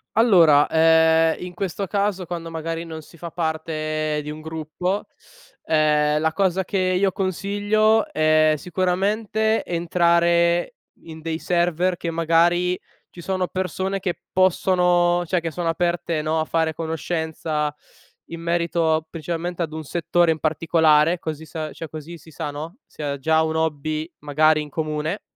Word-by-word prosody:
Allora, 170 -10 +6
ehm, 160 0 +4
in 180 - -8
questo 195 +2 -3
caso 200 -1 -1
quando 170 -1 -5
magari 165 +1 -4
non 160 -1 -7
si 170 - -17
fa 170 +1 -7
parte 155 -2 -2
di 150 - -6
un 155 - -8
gruppo, 160 +5 -3 0.6
ehm, 150 -1 +2
la 160 +1 0
cosa 190 -1 +1
che 200 - -2
io 185 +1 +2
consiglio 205 +3 +1
è 155 0 +3
sicuramente 200 +6 0
entrare 170 0 +2 0.3
in 160 -1 -10
dei 160 0 -3
server 175 +1 0
che 170 - -4
magari 170 +2 +2 0.3
ci 175 - -11
sono 185 0 -1
persone 190 +2 -2
che 180 -2 -3
possono 180 -1 +3
cioè 180 - +1
che 165 -1 -4
sono 170 +1 -2
aperte, 170 -1 -1
no, 160 +1 0
a 160 - 0
fare 160 -1 0
conoscenza 160 -1 -3 0.6
in 165 0 -7
merito 170 -2 0
principalmente 170 +2 -4
ad 160 -2 -2
un 160 0 -6
settore 170 +2 +1
in 160 - -2
particolare, 160 +1 +3
così 160 -1 -5
sa 155 -1 -5
cioè 165 - -8
così 160 +2 -8
si 160 0 -17
sa, 150 - -5
no, 155 - -7
se 155 - -9
ha 140 -1 -2
già 160 +3 +2
un 160 0 -2
hobby 155 +1 -2
magari 155 +1 +3
in 150 - -10
comune 155 +4 -3
165 Hz, 150 wpm, -22 LUFS, 155-180 Hz, 0.6 s, Allora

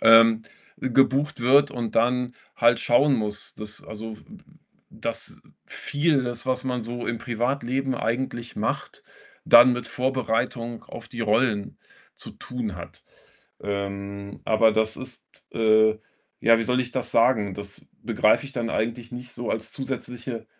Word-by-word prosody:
ähm, 115 0 +7 0.3
gebucht 135 +3 +2
wird 140 +4 +5
und 120 -4 -4
dann 125 +1 +2 0.2
halt 115 0 +4
schauen 135 +4 +4
muss, 105 -3 -3
dass, 105 0 -6
also, 110 0 -7
w - - -16
w - - -13
w - - -22 0.5
dass - - -5
w - - -24
vieles, 135 -6 -1
was 130 0 -1
man 125 -2 -2
so 120 +2 -5
im 115 - -1
Privatleben 130 +3 -1
eigentlich 120 0 -3
macht, - - -3 0.4
dann 120 +2 +9
mit 120 -1 -3
Vorbereitung 120 -2 -1
auf 115 -1 -9
die 120 - -7
Rollen 110 -1 +1 0.4
zu - - -8
tun 115 -6 -5
hat. 85 - -11 0.6
Ähm, 100 0 -5
aber 110 0 +4
das 110 0 +1
ist, - - -7 0.3
äh 110 -1 +4 0.4
ja, 115 0 +5
wie - - 0
soll 125 +2 +1
ich 125 0 -3
das 125 -2 -1
sagen? 115 -5 +3
Das 100 +1 -9
begreife - - +3
ich 140 - -9
dann 120 -2 -2
eigentlich 120 +2 -2
nicht 125 0 -8
so 120 -1 -5
als 110 0 -3
zusätzliche 125 -2 -5
120 Hz, 150 wpm, -25 LUFS, 110-125 Hz, 0.6 s, dann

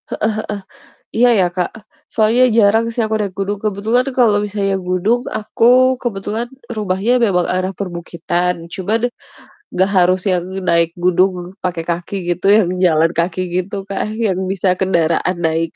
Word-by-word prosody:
Heeh - - -5 0.7
heeh. - - -30 0.2
Iya 245 +2 +5
ya 180 - +4
Kak, 180 -2 -1 0.4
soalnya 225 +3 +3
jarang 220 +1 +4
sih 230 - -5
aku 220 0 -1
naik 210 -3 -1
gunung, 200 +1 -1
kebetulan 215 +4 +1
kalau 230 -5 +4
misalnya 200 -1 -1
gunung 190 +6 0
aku 245 +4 +3
kebetulan 220 +1 -3 0.3
rumahnya 200 +2 0
memang 180 -4 +1
arah 185 +1 -1
perbukitan, 175 -1 -3
cuman 205 +4 -1 0.8
gak 190 +2 +3
harus 185 +1 +3
yang 180 -1 0 0.2
naik 170 -1 +3
gunung 180 0 +1
pakai 175 -2 -2
kaki 175 +3 -3 0.2
gitu 180 +3 -3
yang 200 -5 +2 0.2
jalan 165 -1 +3
kaki 170 +2 -1
gitu 185 +3 -2
kan 200 +1 -2
yang 205 -5 0
bisa 190 -1 +1
kendaraan 170 -1 +1
naik. 165 -1 -1
190 Hz, 150 wpm, -17 LUFS, 175-215 Hz, 0.8 s, Iya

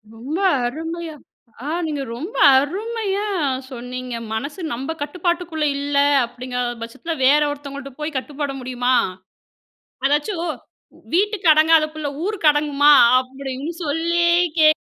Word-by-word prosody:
ரொம்ப 265 +8 -5 0.3
அருமையா 325 +4 -5 0.5
ஆ, - - -3 0.2
நீங்க 300 -3 -3
ரொம்ப 330 - -7 0.2
அருமையா 410 +6 -2 0.4
சொன்னீங்க! 250 0 -6 0.2
"மனசு 280 +10 -4
நம்ப 265 +6 -4
கட்டுப்பாட்டுக்குள்ள 335 +1 -2
இல்ல" 285 0 -2 0.3
அப்டிங்கற 250 +1 -5 0.2
பட்சத்துல, 235 +9 -5
வேற 285 +3 +5
ஒருத்தவங்கள்ட்ட 280 -1 -8
போய் 300 0 -4
கட்டுப்பட 285 +1 -4
முடியுமா? 250 0 -1 1.1
அதாச்சும் 295 +6 0 0.7
"வீட்டுக்கு 400 -1 +1
அடங்காத 310 0 +5
புள்ள 305 -2 -3 0.2
ஊருக்கு 395 -7 +2
அடங்குமா?" 295 0 +4 0.3
அப்டின்னு, 265 +3 -6
சொல்லியே 340 +3 +2 0.2
கேக் 310 0 +6
295 Hz, 110 wpm, -21 LUFS, 270-330 Hz, 1.1 s, கேக்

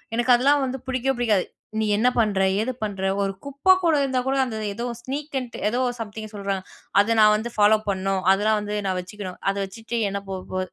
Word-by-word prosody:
எனக்கு 240 +2 +4
அதெல்லாம் 280 +3 +3
வந்து 265 +1 -4
பிடிக்கவே 260 +1 0
பிடிக்காது. 215 -6 +2 0.3
நீ 220 - +1
என்ன 220 +4 +2
பண்ணுற, 210 -4 +2 0.2
ஏது 245 +4 -1
பண்ணுற, 200 -3 -3 0.2
ஒரு 195 0 -1
குப்ப 280 +7 +4
கூட 335 -2 +4
இருந்தா 265 -2 0
கூட 265 +1 +1
அந்த 225 -4 -5
ஏதோ 235 +4 -4 0.2
ஸ்னீக்குன்ட்டு 265 -1 -4
ஏதோ 240 +4 0 0.2
சம்திங் 215 -1 -6
சொல்றாங்க, 195 -2 -3 0.4
அத 210 +3 +4
நான் 210 0 +7
வந்து 220 +3 -3
ஃபாலோ 210 +1 +5
பண்ணணும், 190 0 0
அதெல்லாம் 210 +3 +3
வந்து 210 0 -4
நான் 190 -1 0
வச்சுக்கணும். 185 0 -7
அத 195 - 0
வச்சுட்டு 225 +4 -6
என்ன 200 0 -2
போ 195 - -4 0.2
போ 185 - -1
220 Hz, 195 wpm, -24 LUFS, 200-255 Hz, 0.4 s, நான்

